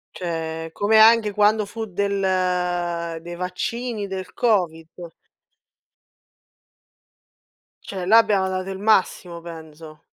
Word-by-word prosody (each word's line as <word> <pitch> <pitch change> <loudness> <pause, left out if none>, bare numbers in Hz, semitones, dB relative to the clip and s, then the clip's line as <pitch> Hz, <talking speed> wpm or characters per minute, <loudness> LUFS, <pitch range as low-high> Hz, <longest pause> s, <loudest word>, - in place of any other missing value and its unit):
Cioè, 165 -2 -4
come 210 +4 +2
anche 220 -1 +6
quando 210 +1 +3
fu 225 +2 -6
del 180 -4 -1
dei 175 +1 -8
vaccini 205 +5 -4
del 190 -1 -6
Covid. 175 -6 -1 2.7
Cioè, 190 -3 -6
là 215 +5 +6
abbiamo 205 -4 +3
dato 185 0 -3
il 190 0 -6
massimo 190 -4 +1
penso. 160 -2 -11
185 Hz, 100 wpm, -22 LUFS, 170-205 Hz, 2.7 s, anche